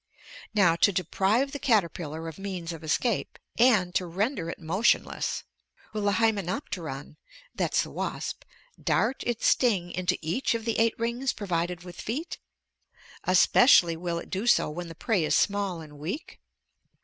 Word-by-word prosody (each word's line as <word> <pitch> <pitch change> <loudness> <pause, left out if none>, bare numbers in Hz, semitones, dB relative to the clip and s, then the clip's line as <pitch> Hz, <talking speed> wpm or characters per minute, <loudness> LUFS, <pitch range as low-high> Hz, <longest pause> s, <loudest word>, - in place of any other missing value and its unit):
"Now, 175 -5 +5
to 200 - +4
deprive 195 - +1
the 285 - -5
caterpillar 170 - 0
of 165 - -8
means 185 -4 -4
of 165 0 -10
escape, 205 +8 -1 0.2
and 210 -8 +4
to 180 - 0
render 190 - -1
it - - -5
motionless, 180 +8 0 0.5
will 215 - -2
the 205 0 +2
Hymenopteron 185 - -2 0.4
[that's - - +1
the - - -9
wasp] - - -4 0.4
dart 270 - +1
its 240 -2 -1
sting 195 -9 +2
into 180 0 0
each 200 +10 -1
of 225 -1 -4
the 230 -2 0
eight 230 0 +2
rings 235 +3 -1
provided 175 -3 -2
with 180 -1 -9
feet? 285 +10 -4 0.9
Especially 185 -1 +6
will 170 0 -3
it - - -8
do 195 +5 -2
so 240 - +4
when 175 +3 -6
the 165 - -9
prey 195 +1 0
is 155 - +2
small 200 -4 +1
and 150 -2 -12
weak? 190 - -6
185 Hz, 155 wpm, -27 LUFS, 170-225 Hz, 0.9 s, Especially